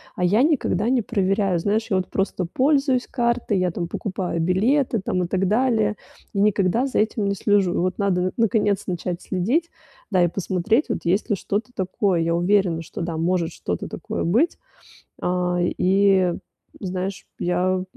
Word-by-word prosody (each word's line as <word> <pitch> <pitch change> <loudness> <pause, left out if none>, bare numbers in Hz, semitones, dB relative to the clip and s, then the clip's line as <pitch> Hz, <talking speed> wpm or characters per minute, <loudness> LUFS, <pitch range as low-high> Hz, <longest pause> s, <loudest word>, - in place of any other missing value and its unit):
А 180 - -2
я 210 +8 +4
никогда 240 - +1
не 255 -1 +2
проверяю, 195 -3 0
знаешь, 215 +5 0
я 190 - +2
вот 185 - -1
просто 190 -2 -1
пользуюсь 270 - +1
картой, 235 -4 0
я 180 -1 +1
там 170 0 -3
покупаю 185 -2 -3
билеты 225 - +2
там 180 -1 0
и - - -2
так 190 +1 0
далее, 220 -2 +2 0.4
и 200 - -1
никогда 205 +4 +2
за 270 - -1
этим 215 -1 0
не 200 0 0
слежу. 195 -2 +2
И - - -2
вот 185 0 0
надо, 185 -2 +1
наконец, 210 -3 +2
начать 175 0 -3
следить, 245 - -1 0.4
да, 185 -2 +4
и - - +4
посмотреть, 195 - 0
вот 225 - -1
есть 190 +7 0
ли - - +4
что-то 210 +6 -3
такое. 185 -1 0
Я 170 +1 +1
уверена, 175 -2 +2
что, - - -7
да, 165 -1 -3
может 170 0 0
что-то 90 - -4
такое - - -4
быть. 235 - +2 0.7
А, 180 0 0
и, 185 0 +3 0.5
знаешь, 185 0 -4
я 185 +1 0
195 Hz, 170 wpm, -23 LUFS, 180-220 Hz, 0.7 s, я